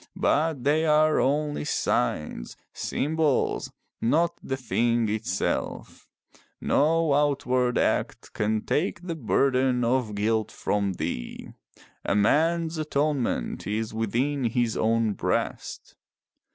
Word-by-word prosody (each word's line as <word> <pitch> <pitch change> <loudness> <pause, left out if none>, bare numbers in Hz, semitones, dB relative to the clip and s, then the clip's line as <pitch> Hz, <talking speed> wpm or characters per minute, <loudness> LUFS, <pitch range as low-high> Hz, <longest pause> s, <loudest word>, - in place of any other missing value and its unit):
But 155 -4 +1
they 150 +3 +2
are 155 0 +4
only 145 +2 0
signs, 70 - -1 0.2
symbols, 155 -1 0 0.3
not 165 +8 +2
the 135 - -3
thing 120 -2 +1
itself. 105 -3 -3 0.5
No 160 +1 +2
outward 130 -4 +1
act - - -1
can 110 0 0
take 175 +2 -1
the 175 -2 -3
burden 130 -2 +1
of 120 -3 0
guilt 110 +1 0
from 100 -2 -1
thee. 75 -8 -5 0.5
A - - 0
man's 160 +9 +2
atonement 150 -3 -1
is 110 +2 -2
within 120 +5 -1
his 115 -1 0
own 115 -1 +1
breast. - - -3
130 Hz, 105 wpm, -26 LUFS, 110-150 Hz, 0.5 s, are